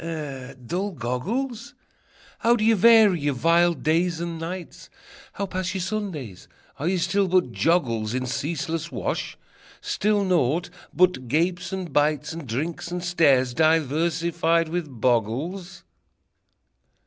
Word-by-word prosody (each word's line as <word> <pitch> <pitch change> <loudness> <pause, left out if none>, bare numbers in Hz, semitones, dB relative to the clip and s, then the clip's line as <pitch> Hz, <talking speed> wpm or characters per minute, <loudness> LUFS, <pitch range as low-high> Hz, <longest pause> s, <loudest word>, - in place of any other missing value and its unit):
eh, 145 -6 -6
dull 190 - -2
goggles? 215 - -3 0.6
How 235 +1 +4
do 215 -2 0
ye 225 - +5
vary 220 -3 +6
your 145 -2 -1
vile 170 +5 +3
days 165 +3 0
and 170 -1 -4
nights? 175 +2 -7 0.4
How 200 - -3
pass 185 0 -3
your 190 - -2
Sundays? 170 - -5 0.3
Are 150 - -2
ye 185 +1 +1
still 195 +3 +1
but 180 -8 +2
joggles 115 -8 0
In 130 0 -1
ceaseless 160 +4 -3
wash? - - -3 0.4
Still 210 0 0
naught 175 -3 +1 0.2
but 180 -9 +2
gapes 170 +7 0
and 185 -6 -5
bites, 150 0 +1
And 165 -4 -8
drinks 155 +9 -3
and 175 0 -4
stares, 140 -8 +3
diversified 165 +2 +1
with 170 -2 -3
boggles? 130 - -1
165 Hz, 130 wpm, -24 LUFS, 145-185 Hz, 0.6 s, vary